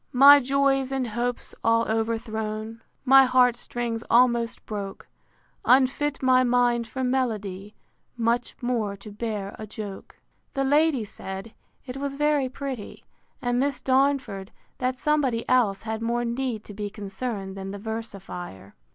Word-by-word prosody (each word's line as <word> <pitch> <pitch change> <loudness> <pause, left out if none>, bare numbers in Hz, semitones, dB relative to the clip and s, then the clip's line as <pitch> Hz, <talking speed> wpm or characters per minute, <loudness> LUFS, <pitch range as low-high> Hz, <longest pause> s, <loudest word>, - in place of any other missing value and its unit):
II. - - -47
My 285 +2 +10
joys 270 0 +1
and 265 -3 -1
hopes 240 +2 -3
all 230 0 +4
overthrown, 220 0 -2 0.2
My 270 0 +8
heart 250 -1 +4
strings 235 -1 -4
almost 235 -1 +3
broke, 200 -2 -6 0.6
Unfit 270 +2 +3
my 255 0 +5
mind 240 -1 +2
for 260 +3 -4
melody, 210 -6 -2 0.4
Much 235 +1 0
more 225 -5 -1
to 200 +2 -11
bear 210 -2 -4
a 215 - -6
joke. 205 -2 -8 0.4
The 275 - +1
ladies 285 -5 +2
said, 190 +4 -7 0.3
It 255 0 -6
was 275 0 -3
very 295 -2 +2
pretty; 260 -4 -7 0.4
and 245 0 +1
Miss 275 -1 0
Darnford, 265 -7 +1 0.3
That 255 0 -1
somebody 270 -4 +1
else 225 -6 +2
had 220 0 -4
more 240 +1 0
need 235 -2 -2
to 205 - -11
be 205 0 -4
concerned 200 -1 -5
than 195 0 -6
the 200 - -5
versifier. 195 - -7
235 Hz, 145 wpm, -25 LUFS, 215-260 Hz, 0.6 s, My